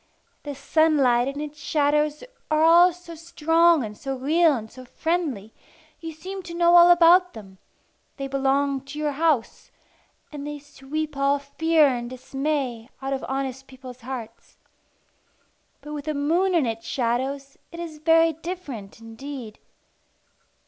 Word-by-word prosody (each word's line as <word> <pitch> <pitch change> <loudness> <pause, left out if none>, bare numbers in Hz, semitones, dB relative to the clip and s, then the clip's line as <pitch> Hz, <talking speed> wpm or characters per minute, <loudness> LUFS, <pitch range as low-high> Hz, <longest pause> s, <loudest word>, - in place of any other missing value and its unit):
The 290 -1 -7
sunlight 275 -4 +2
and 275 +1 -4
its 300 0 -7
shadows 300 0 0 0.3
are 310 0 +2
all 345 +2 +7
so 350 -1 -12
strong 330 -1 +2
and 210 -1 -7
so 270 +4 -5
real 310 +4 +3
and 220 -2 -7
so 255 - -12
friendly, 275 - -3 0.5
you 325 -1 -7
seem 375 +5 -8
to 340 -1 -9
know 345 0 +4
all 345 0 +8
about 350 +1 +6
them; 195 -4 -12 0.6
they 275 -1 -4
belong 275 0 0
to 275 +2 -9
your 300 -1 -1
house, 285 -5 -1 0.6
and 290 -1 -7
they 295 0 -5
sweep 290 +2 -6
all 275 +1 +2
fear 310 +3 +2
and 240 -3 -1
dismay 260 -2 -3
out 270 0 -3
of 265 - -4
honest 270 0 -4
people's 255 -1 -12
hearts. 235 -2 -9 1.2
But 300 - -9
with 290 -1 -6
the 310 -1 -2
moon 340 +6 +1
and 320 -6 +3
its 225 -1 -4
shadows 270 +3 -2
it 335 - -9
is 325 -3 -7
very 325 +1 +4
different 295 - -8
indeed. 225 0 -9
285 Hz, 150 wpm, -24 LUFS, 260-325 Hz, 1.2 s, all